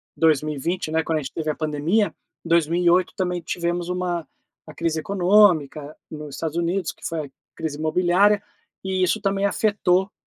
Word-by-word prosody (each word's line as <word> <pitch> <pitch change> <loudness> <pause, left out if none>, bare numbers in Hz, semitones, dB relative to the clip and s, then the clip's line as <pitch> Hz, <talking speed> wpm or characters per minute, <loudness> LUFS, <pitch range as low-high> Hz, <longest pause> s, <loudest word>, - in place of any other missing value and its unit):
2020, 155 +2 0
né, 160 0 +1
quando 160 -1 0
a - - -4
gente 135 - -7
teve 155 -1 -3
a 150 - -1
pandemia. 155 +7 0 0.3
2008 170 +2 +3
também 180 -2 -1
tivemos 175 +1 -2
uma 180 -2 -2 0.4
uma 155 - -11
crise 165 -1 -1
econômica, 175 -6 +3 0.2
nos 150 -2 -7
Estados 160 0 -3
Unidos, 170 0 0
que - - -22
foi 160 -2 -3
a 140 - -13 0.3
crise 150 -2 -4
imobiliária, 180 +6 +3 0.4
e 190 -1 -1
isso 215 +4 +1
também 195 0 0
afetou 200 -2 +1
170 Hz, 160 wpm, -23 LUFS, 155-185 Hz, 0.4 s, 2008